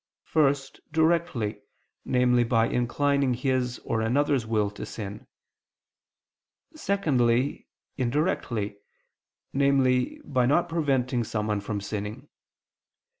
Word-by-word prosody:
First, 140 -3 +1
directly, 160 -10 +1 0.4
namely 125 -1 +3
by 115 -1 +2
inclining 135 +2 +1
his 125 -1 0
or 110 - 0
another's 130 +1 +1
will 105 -2 +1
to 105 - -8
sin; 105 -2 -7 1.5
secondly, 140 - +1 0.3
indirectly, 120 - -1 0.8
namely 135 -2 +2
by 130 -4 +1
not 160 +6 +3
preventing 135 -7 0
someone 105 -1 -2
from 105 0 -3
sinning. 105 +7 -5
125 Hz, 90 wpm, -27 LUFS, 115-140 Hz, 1.5 s, namely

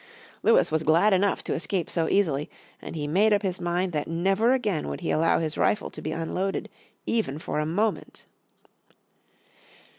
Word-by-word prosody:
Lewis 225 - +4
was 160 0 +1
glad 170 +7 +4
enough 195 +1 +1
to - - -2
escape 175 +1 -1
so 165 -2 -1
easily, 155 -7 +1 0.3
and - - -8
he 150 -2 -3
made 195 +9 +3
up 205 0 +1
his 185 -2 -2
mind 175 +1 -1
that 150 -1 -2
never 195 +8 +2
again 215 -11 0
would 70 0 -5
he - - -1
allow 165 +1 +3
his 160 -1 -3
rifle 210 - +1
to 155 - -9
be 155 - -4
unloaded 180 +4 -3 0.4
even 220 -11 -1
for 150 - -3
a 150 - -1
moment. 210 +7 -2
175 Hz, 175 wpm, -26 LUFS, 155-200 Hz, 0.4 s, Lewis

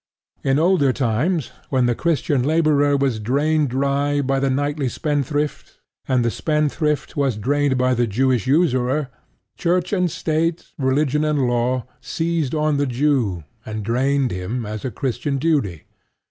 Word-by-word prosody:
In 135 0 +2
older 165 -4 +3
times, 130 +5 0 0.2
when 130 -2 +2
the 120 - +2
Christian 145 -2 0
laborer 145 -1 +3
was 135 -5 0
drained 145 +6 +1
dry 140 +2 0
by 135 0 0
the 135 0 +1
knightly 145 0 -1
spendthrift, 145 0 -2 0.3
and 125 -2 +2
the 115 - +1
spendthrift 150 0 -1
was 135 -6 0
drained 140 +4 +1
by 130 0 +2
the 120 -1 +1
Jewish 125 +2 +1
usurer, 135 -2 +2 0.5
Church 180 +2 0
and 180 -3 +2
State, 165 +2 -1
religion 140 +2 +1
and 150 -4 +1
law, 120 +1 0 0.2
seized 165 -5 -1
on 155 -1 +1
the 140 0 +1
Jew 125 - 0 0.2
and 110 -1 -5
drained 130 +2 +1
him 100 +7 -3
as 105 0 -6
a 130 - -2
Christian 130 +4 -2
duty. 135 - 0
140 Hz, 145 wpm, -21 LUFS, 125-150 Hz, 0.5 s, older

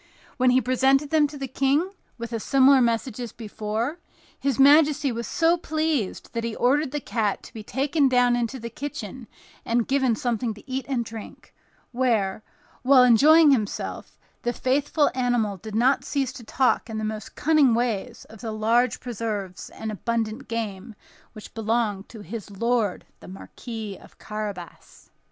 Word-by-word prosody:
When 255 -1 +4
he 250 +1 +5
presented 265 +3 +2
them 310 -2 +4
to 290 0 -10
the 270 -1 -4
King, 280 +8 +1 0.3
with 235 0 -6
a 230 - -1
similar 270 +3 +5
message 235 0 0
as 240 -2 -5
before, 220 +6 -4 0.4
his 275 -3 0
majesty 290 0 +5
was 235 -1 -4
so 340 0 +2
pleased 310 - -2
that 230 - -2
he 230 -1 -3
ordered 280 +4 +2
the 295 +2 -3
cat 215 -5 -2
to - - -13
be 220 - -7
taken 275 +5 +1
down 245 -1 +3
into 240 +2 -2
the 235 0 -7
kitchen 260 -3 -7 0.4
and 230 0 0
given 265 -4 +2
something 235 -1 -2
to 210 - -16
eat 265 0 -4
and 245 -4 -1
drink; 225 -1 -10 0.4
where, 225 -6 0 0.4
while 260 0 +6
enjoying 295 +6 +6
himself, 215 -7 -2 0.2
the 240 - -1
faithful 285 +4 +1
animal 245 -5 0
did 215 +3 -8
not 255 +4 +3
cease 270 -3 -2
to 255 - -10
talk 250 +1 +1
in 220 - -4
the 215 - -3
most 215 -1 -5
cunning 295 -6 +4
way 235 -1 -1 0.2
of 220 -2 -14
the 225 - -4
large 225 +2 +1
preserves 210 -6 -5
and 220 -1 -6
abundant 230 +3 -3
game 220 -1 -5 0.4
which 215 - -11
belonged 220 -3 -1
to 220 - -10
his 205 +2 -7
lord 220 -1 -1
the - - -13
Marquis 215 +2 -8
of - - -18
Carabas. 205 -5 -8
240 Hz, 165 wpm, -24 LUFS, 220-270 Hz, 0.4 s, while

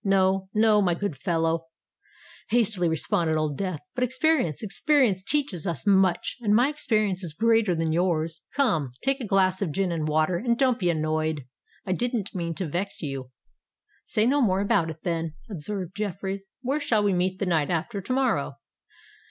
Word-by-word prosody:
"No—no, 195 +2 +3
my 175 -3 +2
good 200 -3 -3
fellow," 165 +3 -1 0.8
hastily 215 -7 +2
responded 160 0 0
Old 155 -2 -1
Death: 185 -2 -3
"but 250 - -1
experience—experience 250 - +2
teaches 205 - 0
us 170 0 -3
much; 190 -3 +2
and 210 -2 +3
my 245 +5 +4
experience 215 -10 0
is 160 -4 -6
greater 225 -3 +3
than 165 -1 0
yours. 165 -2 0
Come—take 225 - 0
a 240 - -4
glass 190 -1 +2
of 185 -6 -1
gin 190 +3 0
and 160 -2 -2
water, 155 +3 +1
and 235 +4 0
don't 255 -2 +2
be 180 - +1
annoyed. 155 -2 -1 0.4
I 185 - -2
didn't 235 0 -1
mean 170 -3 -3
to 185 - -3
vex 180 +5 -4
you." 135 -3 -5 0.8
"Say 215 - +2
no 280 +4 +3
more 195 -5 +2
about 170 -5 +2
it, 160 0 -9
then," 165 -3 -2 0.2
observed 190 +1 -5
Jeffreys. 195 -1 -4 0.2
"Where 275 +4 0
shall 225 -8 +1
we 200 -1 +2
meet 185 +1 0
the 195 - -2
night 160 -5 +1
after 180 +5 -2
to 195 - -6
morrow?" 265 0 +1
190 Hz, 170 wpm, -26 LUFS, 165-215 Hz, 0.8 s, my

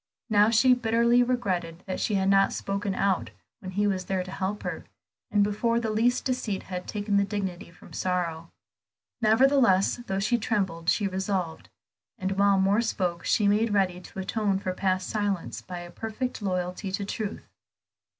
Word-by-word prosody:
Now 210 0 +5
she 245 +3 +5
bitterly 235 0 +3
regretted 185 -9 -1
that 185 - -4
she 210 - 0
had 190 0 +1
not 195 0 +4
spoken 200 0 -2
out 195 -2 +1 0.3
when 185 0 -8
he 205 +2 +1
was 190 -2 0
there 190 -1 -1
to 185 - -9
help 195 +2 -3
her, - - -4 0.4
and 205 -1 +3
before 230 +3 +1
the 225 -2 -2
least 235 +3 +1
deceit 250 -6 -2
had 180 -1 -6
taken 205 -1 -1
the 200 - +4
dignity 195 -4 -4
from 170 - -16
sorrow. 170 -3 -2 0.7
Nevertheless, 225 -3 +4
though 195 - -1
she 225 +5 +1
trembled 190 -7 -1
she 205 - +2
resolved; 190 -3 -3 0.5
and 190 -1 -2
while 200 0 +3
Moor 195 +4 +3
spoke 180 -6 -1
on, - - -14
she 210 - +3
made 210 +1 +2
ready 185 -2 +1
to 185 - -13
atone 200 +1 0
for 185 -1 -3
past 185 -1 0
silence 205 -4 -2
by 180 -1 -7
a 175 0 -10
perfect 225 +5 -4
loyalty 185 0 -2
to 195 +1 -2
truth. 210 +1 -5
200 Hz, 175 wpm, -27 LUFS, 185-215 Hz, 0.7 s, Now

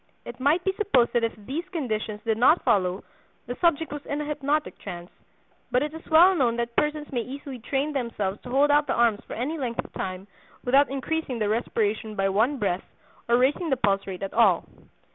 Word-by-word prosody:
It 240 +1 -9
might 295 +7 +2
be 385 - +1
supposed 280 - +2
that 240 -1 +2
if 230 - -1
these 290 +8 -3
conditions 220 - -3
did 225 -1 0
not 300 +8 +5
follow 185 -1 +1 0.4
the 245 - -5
subject 325 -3 +2
was 290 -1 -6
in 285 - -2
a 300 - -3
hypnotic 295 +1 -1
trance; 175 0 -8 0.6
but 250 +2 +2
it 300 +1 -4
is 320 - -9
well 340 +4 +7
known 250 -9 +1
that 235 0 -3
persons 300 +2 -1
may 245 -3 -1
easily 270 +1 -7
train 275 +5 -2
themselves 220 -7 -2
to 250 - -10
hold 280 +3 +3
out 295 0 +3
the - - 0
arms 230 -3 +2
for - - -7
any 295 +7 -3
length 240 -4 -3
of - - -14
time 185 0 -5 0.4
without 270 +3 +4
increasing 275 0 -2
the 215 -2 0
respiration 215 -1 -1
by 195 -1 +1
one 225 +9 +2
breath 195 -5 -1 0.5
or 235 - +5
raising 285 +7 +1
the 265 - +1
pulse 200 -5 +1
rate 190 0 -6
at 195 - -4
all. 205 -7 +4
250 Hz, 210 wpm, -26 LUFS, 215-295 Hz, 0.6 s, well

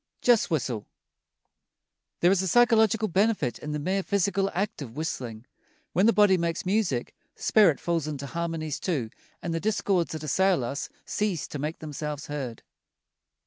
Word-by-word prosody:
JUST 240 -4 +4
WHISTLE 125 - -2 1.3
There 175 - +5
is 195 -1 +3
a 190 - -1
psychological 220 0 +4
benefit 195 - +1
in 150 - -5
the 150 - -1
mere 185 +6 0
physical 195 0 +1
act 200 -1 -2
of 120 -4 -7
whistling. 125 -7 -4 0.5
When 185 +6 +4
the - - +7
body 205 -3 +5
makes 170 +1 -2
music, 185 - 0 0.2
the - - -13
spirit 200 -9 +5
falls 165 -3 -1
into 140 -2 -4
harmonies 165 -1 -3
too 135 -12 -2 0.3
and 170 - -2
the 165 - 0
discords 195 -3 0
that 155 -1 -5
assail 185 +1 +2
us 140 +5 -4 0.2
cease 205 -6 -1
to 145 - -5
make 150 +3 -3
themselves 150 -1 -5
heard. 135 -6 -5
170 Hz, 160 wpm, -27 LUFS, 145-195 Hz, 1.3 s, the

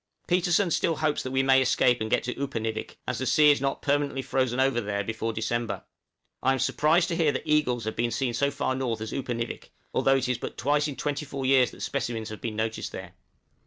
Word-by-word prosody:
Petersen 175 +1 +2
still 165 - +1
hopes 150 -1 0
we 130 +1 +1
may 135 0 +5
escape 125 -1 +3
and 110 - -2
get 115 - +1
into 125 - -4
Upernivik, 115 -5 -3
as 125 - -2
the 130 - -2
sea 150 -1 +6
is 145 - +1
not 135 0 -2
permanently 140 -1 0
frozen 130 -1 0
over 130 -2 +2
there 100 -1 -2
before 110 +2 -3
December. 115 0 -2 0.6
I 135 - +3
am - - 0
surprised 160 +6 +2
to 170 - -1
hear 160 -3 +3
that - - -4
eagles 140 -6 +2
have 110 +1 -3
been 120 +1 0
seen 120 +1 -1
so 140 +4 +1
far 140 -2 -1
north 125 -4 -2
as 110 - -5
Upernivik, 120 -3 -4 0.2
although 135 - +3
it 130 -1 -1
is 125 -2 -1
but - - -6
twice 145 +4 +1
in 145 - -5
twenty 145 +1 -3
four 135 -1 -4
years 130 -1 +5
that - - -13
specimens 115 -2 -3
have 110 - -8
been 110 -2 -4
noticed 110 +1 -2
there. - - -8
130 Hz, 225 wpm, -27 LUFS, 115-145 Hz, 0.6 s, sea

